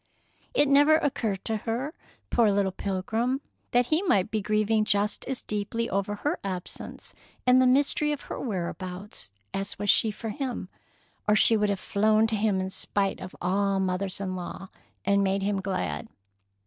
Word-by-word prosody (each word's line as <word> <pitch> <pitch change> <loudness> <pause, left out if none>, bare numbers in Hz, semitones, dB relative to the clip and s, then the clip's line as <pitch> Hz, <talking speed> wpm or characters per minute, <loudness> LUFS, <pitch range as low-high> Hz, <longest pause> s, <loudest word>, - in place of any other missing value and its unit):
It 290 - +5
never 290 +3 +6
occurred 230 - -1
to 220 -1 0
her, 235 +8 -3 0.4
poor 230 -3 +4
little 200 -1 +1
pilgrim, 220 +8 -1 0.3
that 245 0 +3
he 315 - +4
might 210 - +2
be 215 -1 0
grieving 215 +1 +2
just 205 0 +1
as 265 -1 -3
deeply 215 +3 -2
over 200 +1 0
her 295 - -2
absence 185 -2 -6 0.3
and 255 +1 +6
the 255 - +5
mystery 285 +3 +3
of 295 - -3
her - - -6
whereabouts 185 - -4 0.2
as 195 +1 -3
was 205 -1 +4
she 220 - +3
for 220 +2 -5
him, 250 -6 -4 0.6
or 210 - +5
she 225 +2 +5
would 210 -1 +2
have 200 -2 0
flown 215 +3 +3
to 220 0 0
him 205 -2 +1
in 190 0 -3
spite 195 0 -1
of 185 - -8
all 195 +2 +1
mothers 190 0 -1
in 185 -2 -3
law, 185 +1 -6 0.4
and 200 0 +3
made 195 0 +1
him 200 -1 0
glad. 90 - -2
205 Hz, 175 wpm, -27 LUFS, 195-230 Hz, 0.6 s, never